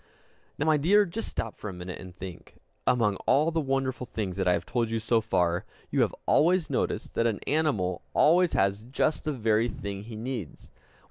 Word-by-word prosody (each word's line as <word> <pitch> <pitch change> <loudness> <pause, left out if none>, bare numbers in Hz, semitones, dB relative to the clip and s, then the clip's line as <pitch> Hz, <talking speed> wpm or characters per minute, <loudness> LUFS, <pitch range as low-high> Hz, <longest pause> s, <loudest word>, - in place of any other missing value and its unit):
Now, 145 - -1
my 155 -1 +4
dear, 200 +8 +4
just 210 +5 -5
stop 115 - -4
for 105 - -5
a - - -6
minute, 90 0 -7
and 90 -1 -11
think. 90 -1 -9 0.3
Among 105 -5 +3
all 155 +4 +4
the 165 - 0
wonderful 135 -2 -1
things 100 -5 -3
that 95 -2 0
I 90 - +5
have - - -1
told 120 -2 0
you 115 - -1
so 115 +1 +2
far, 90 -5 +1 0.3
you - - +2
have - - +1
always 170 0 +3
noticed - - -1
that 115 - +2
an 110 -3 -1
animal 135 - 0
always 175 +3 +5
has 100 +2 +1
_just 135 +5 0
the 155 - -2
very 115 -3 +2
thing 100 -1 -6
he 115 -1 -8
needs! 115 - -6
115 Hz, 200 wpm, -28 LUFS, 100-150 Hz, 0.3 s, I